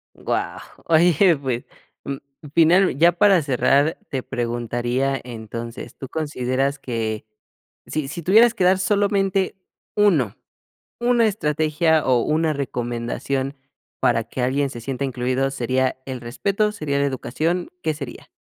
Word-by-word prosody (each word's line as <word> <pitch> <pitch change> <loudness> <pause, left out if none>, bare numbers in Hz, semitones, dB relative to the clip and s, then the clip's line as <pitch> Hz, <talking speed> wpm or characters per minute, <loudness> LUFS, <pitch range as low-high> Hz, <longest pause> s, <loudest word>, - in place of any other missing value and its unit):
Guau, - - -2 0.3
oye 170 +1 +4
pues, 130 -3 -3 0.4
mm, 140 0 -4 0.4
final 170 0 +5
ya 170 +3 +6
para 190 0 +4
cerrar 140 +3 +2
te 130 -2 -3
preguntaría, 120 +2 -1
entonces, 115 0 -7
¿tú 135 - -7
consideras 140 -2 -1
que, 110 -5 -3 0.6
si 155 -3 -2
si 170 +3 -6
tuvieras 225 +7 +6
que 190 - 0
dar 185 +1 +4
solamente 195 0 +1 0.4
uno, 170 - +3 0.6
una 240 -1 +3
estrategia, 155 -4 +1
o 125 -2 +3
una 160 +1 +1
recomendación 130 +1 -3 0.4
para 115 - +3
que 120 +3 -5
alguien 135 +3 +1
se 120 -3 -8
sienta 135 +3 -3
incluido 130 +1 0
sería 130 0 0
el 130 -2 -5
respeto, 200 - 0
sería 145 -8 -2
la 140 - +2
educación?, 155 +6 -2
¿qué 155 - +1
sería? 140 -5 -8
140 Hz, 130 wpm, -22 LUFS, 125-170 Hz, 0.6 s, ya